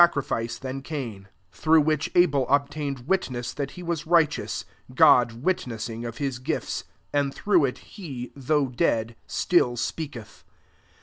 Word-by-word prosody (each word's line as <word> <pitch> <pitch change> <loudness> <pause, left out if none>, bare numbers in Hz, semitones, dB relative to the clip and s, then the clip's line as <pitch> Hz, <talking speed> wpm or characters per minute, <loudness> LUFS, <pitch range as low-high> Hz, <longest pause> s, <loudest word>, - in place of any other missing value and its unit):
crifice 115 -5 -2
than 135 +1 -5
Cain; 120 -10 -6 0.2
through 160 0 +4
which 155 0 +1
Mel 145 -7 +4
obtained 140 -2 0
witness 125 -10 -1
that 140 -1 -4
he 180 - -7
was 165 -3 -3
righteous, 165 -3 +2 0.3
God 125 -6 +5
witness 120 - -1
ing 115 +1 -6
of 115 0 -6
his 135 -4 -2
gifts: 130 - -3 0.3
and 145 -1 +1
through 180 -2 +3
it 125 - -3
he, 135 - -8
though 140 +1 +1
dead, 115 -2 0
still 125 -9 +2
speaketh. 120 -4 -5
140 Hz, 140 wpm, -26 LUFS, 120-155 Hz, 0.3 s, God